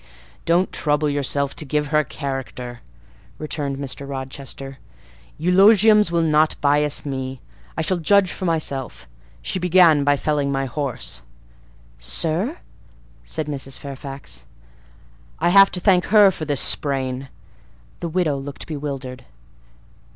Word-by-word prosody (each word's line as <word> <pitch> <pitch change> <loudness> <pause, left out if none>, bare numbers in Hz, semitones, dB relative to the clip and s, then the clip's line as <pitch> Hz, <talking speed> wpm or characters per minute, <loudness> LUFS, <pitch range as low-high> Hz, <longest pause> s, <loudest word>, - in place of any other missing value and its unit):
"Don't 175 +3 +2
trouble 150 0 0
yourself 140 -1 -1
to - - -3
give 150 0 -1
her 150 +1 +3
a - - +1
character," 130 -3 -6 0.6
returned 145 -3 -3
Mr. 140 0 -5
Rochester: 135 0 -6 0.6
"eulogiums 210 +4 +5
will 170 -1 +2
not 155 0 +3
bias 145 0 +1
me; 130 -2 -4 0.4
I 160 - 0
shall 185 +3 0
judge 195 +2 +3
for 185 - -5
myself. 150 - -2 0.4
She 185 - -2
began 175 -4 +5
by 145 0 +3
felling 145 -1 0
my 135 0 -1
horse." 130 - -4 0.8
"Sir?" 170 - -2 0.7
said 150 - -3
Mrs. 135 -2 -6
Fairfax. 135 - -9 0.9
"I - - +1
have 195 +2 +7
to 180 - -3
thank 180 -1 +3
her 205 -1 +6
for 160 - -6
this 145 -3 +2
sprain." 135 -2 0 0.7
The 170 - -4
widow 160 -4 0
looked 140 +1 -7
bewildered. 135 -4 -6
145 Hz, 130 wpm, -21 LUFS, 135-170 Hz, 0.9 s, have